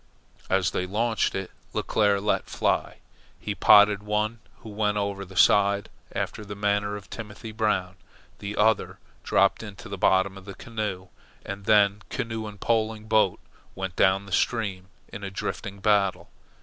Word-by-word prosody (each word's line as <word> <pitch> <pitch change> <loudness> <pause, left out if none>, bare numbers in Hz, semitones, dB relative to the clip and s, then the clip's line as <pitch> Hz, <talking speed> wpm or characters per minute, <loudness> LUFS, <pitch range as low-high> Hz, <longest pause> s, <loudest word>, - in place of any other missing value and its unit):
As 95 -1 +2
they 90 - -2
launched 110 +3 0
it, 95 -1 -4 0.2
Leclere 105 -2 +2
let 105 +2 0
fly. - - -1 0.4
He 105 - -3
potted 105 0 +6
one, 105 +2 -1 0.2
who 110 - -10
went 105 0 0
over 100 -1 -2
the 95 +1 -14
side 100 0 +4 0.3
after - - -3
the 105 0 -7
manner 105 0 0
of 100 -3 -9
Timothy 110 0 -8
Brown. 105 -4 -1 0.4
The 100 +1 -5
other 110 0 +2 0.3
dropped 100 0 +3
into 105 +1 -9
the 100 -2 -6
bottom 95 +1 +2
of 95 - -17
the 100 - -8
canoe, 105 -5 -5 0.4
and 100 0 -6
then 105 -1 +4
canoe 115 -1 -3
and 105 -1 -10
poling 110 -1 0
boat 110 0 +3 0.4
went 95 -2 -4
down 95 +1 +3
the 100 - -12
stream 95 -3 0 0.3
in 100 - -7
a 100 - -3
drifting 100 +1 -5
battle. 100 -2 +1
105 Hz, 160 wpm, -26 LUFS, 100-110 Hz, 0.4 s, potted